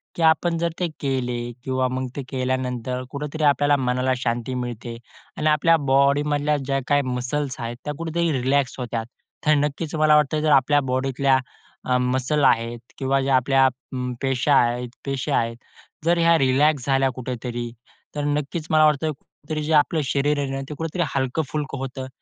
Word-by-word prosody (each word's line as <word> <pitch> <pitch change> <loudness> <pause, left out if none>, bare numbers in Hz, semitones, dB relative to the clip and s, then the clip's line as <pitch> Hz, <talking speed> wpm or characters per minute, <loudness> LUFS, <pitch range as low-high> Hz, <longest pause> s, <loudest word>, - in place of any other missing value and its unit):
की - - -4
आपण 165 +1 +3
जर 170 +1 0
ते 180 - +1
केले 130 -3 -1 0.3
किंवा 130 -1 0
मग 130 +1 -3
ते 140 - -3
केल्यानंतर 130 -1 -2
कुठेतरी 150 +2 -4
आपल्याला 145 0 +4
मनाला 125 0 0
शांती 120 0 -2
मिळते 120 -1 -6 0.4
आणि 155 - 0
आपल्या 155 +2 +4 0.2
बॉडीमधल्या 145 +2 +3
ज्या 135 0 -1
काही 145 -1 +3
मसल्स 130 +2 -3
आहेत, 120 0 -4
त्या 150 - -2
कुठेतरी 165 +1 -1
रिलॅक्स 135 +1 +1
होतात. 120 -2 -3 0.4
तर 155 - +5
नक्कीच 150 +2 -1
मला 155 -1 +5
वाटतं, 150 0 +2
जर 155 0 +2
आपल्या 145 +1 +4
बॉडीतल्या 135 +1 +2 0.5
अ, 125 0 +2
मसल 130 +4 0
आहेत 115 0 +2 0.2
किंवा 135 0 +1
जे 135 - -2
आपल्या 135 +1 +4 0.3
म 125 0 -3
पेशा 135 +2 +1
आहेत 120 -1 +2 0.2
पेशे 135 -2 -2
आहेत, 115 0 +1 0.5
जर 170 +1 +3
ह्या 165 0 +5
रिलॅक्स 135 0 +2
झाल्या 135 -1 +2
कुठेतरी, 120 -1 -5 0.4
तर 145 - -2
नक्कीच 145 +2 -2
मला 155 -1 +5
वाटतं 155 +1 +2
कुठेतरी 150 +1 -7
जे 155 +2 -1
आपलं 155 +1 +3
शरीर 145 +2 +1
आहे 140 -1 -2
ना, 135 0 -3
ते - - -4
कुठेतरी 165 +2 -2
हलकं-फुलकं 140 +2 -2
होतं 130 0 -5
135 Hz, 165 wpm, -23 LUFS, 130-150 Hz, 0.5 s, तर